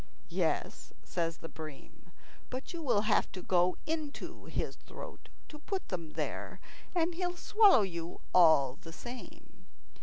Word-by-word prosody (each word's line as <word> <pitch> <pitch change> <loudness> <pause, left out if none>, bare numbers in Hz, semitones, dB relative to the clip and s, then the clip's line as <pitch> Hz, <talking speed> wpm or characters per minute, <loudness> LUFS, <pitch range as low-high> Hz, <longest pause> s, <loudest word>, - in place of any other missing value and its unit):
"Yes," - - -1
said 165 -2 -1
the 165 - -9
bream; 155 -3 -10 0.4
"but 255 +7 -5
you 340 - -4
will 245 -9 +3
have 215 0 +2
to 185 -2 -6
go 180 0 +3
into 310 -2 -4
his - - -2
throat - - -10 0.2
to 300 - -9
put 380 +5 -3
them 165 -4 -4
there, - - -3 0.4
and 340 0 +2
he'll 355 0 -2
swallow 405 - +6
you 170 -3 -4
all 155 -6 +6
the 165 - -9
same. 245 +7 -10
205 Hz, 145 wpm, -33 LUFS, -, 0.4 s, swallow